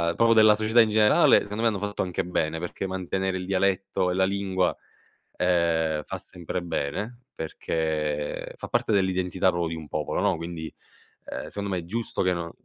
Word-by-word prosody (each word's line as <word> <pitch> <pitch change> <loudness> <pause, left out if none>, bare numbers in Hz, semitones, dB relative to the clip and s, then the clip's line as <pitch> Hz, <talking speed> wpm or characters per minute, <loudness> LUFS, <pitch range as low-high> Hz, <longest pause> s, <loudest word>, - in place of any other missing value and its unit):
proprio 115 +3 +4
della 110 -1 +7
società 110 +2 +4
in 110 - +3
generale, 105 0 +5
secondo 105 +2 -5
me 115 - +3
hanno 105 -3 0
fatto 100 +1 -3
anche 95 0 -1
bene, 80 -2 -1
perché 90 +3 -4
mantenere 95 0 -2
il 90 - -5
dialetto 95 -1 +1
e - - 0
la 95 - +3
lingua, 95 -2 0 0.6
ehm, 85 -3 +1
fa - - -6
sempre 90 +1 -5
bene 100 +9 -3
perché, 75 -2 -2
fa - - -7
parte - - +1
dell'identità 95 -1 +2
proprio 85 -2 -1
di 85 - -4
un 80 -2 -9
popolo, 75 -1 -2
no, - - +2
quindi, 85 -1 -6 0.5
ehm, - - -6
secondo 100 -1 -4
me 95 -2 -1
è 85 - -8
giusto 115 +6 -3
che 90 -1 +2
non 85 -1 -4
95 Hz, 185 wpm, -26 LUFS, 85-100 Hz, 0.6 s, della